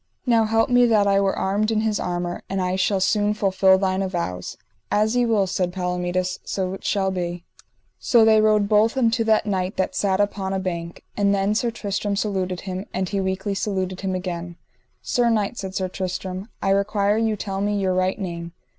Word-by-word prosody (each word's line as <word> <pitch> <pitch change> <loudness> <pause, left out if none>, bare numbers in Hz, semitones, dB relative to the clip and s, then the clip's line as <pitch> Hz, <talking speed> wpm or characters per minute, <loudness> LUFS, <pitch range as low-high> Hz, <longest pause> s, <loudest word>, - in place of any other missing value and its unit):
Now 230 -3 +3
help 225 +2 +1
me 245 0 +5
that 215 -3 +3
I 200 0 +3
were 195 -1 0
armed 205 +3 0
in 220 -1 +1
his 220 -2 0
armour, 175 0 -3
and 195 - -2
I 185 0 0
shall 190 +1 +1
soon 205 +2 +1
fulfil 190 -2 +4
thine 190 0 0
avows. 175 - -3 0.3
As 215 +3 +1
ye 245 -1 +2
will, 215 -4 +2
said 180 -1 -1
Palomides, 180 0 -2
so 185 -1 -2
it 195 - -8
shall 195 -2 0
be. 175 -1 -4 0.6
So 235 -3 +4
they 220 -1 +5
rode 215 -1 +3
both 215 +4 +3
unto 230 -2 +2
that 220 -1 +3
knight 190 -2 -2
that 190 - 0
sat 195 -1 0
upon 200 -2 -1
a 190 - 0
bank, 170 -2 -5
and 200 -1 +2
then 195 +1 +1
Sir 235 +2 0
Tristram 205 -2 -2
saluted 190 -3 -2
him, 185 0 -5
and 190 -1 -2
he 200 -2 -1
weakly 190 +2 -2
saluted 190 -2 -2
him 190 -1 -2
again. 175 -1 -5 0.5
Sir 240 -1 +1
knight, 220 +1 0
said 190 -1 -6
Sir 185 - -1
Tristram, 185 +2 -5
I 195 - +2
require 200 +1 +1
you 225 -1 +1
tell 195 -1 -4
me 205 0 0
your 190 -1 +1
right 185 +1 0
name. 170 -4 -5
195 Hz, 200 wpm, -23 LUFS, 185-210 Hz, 0.6 s, me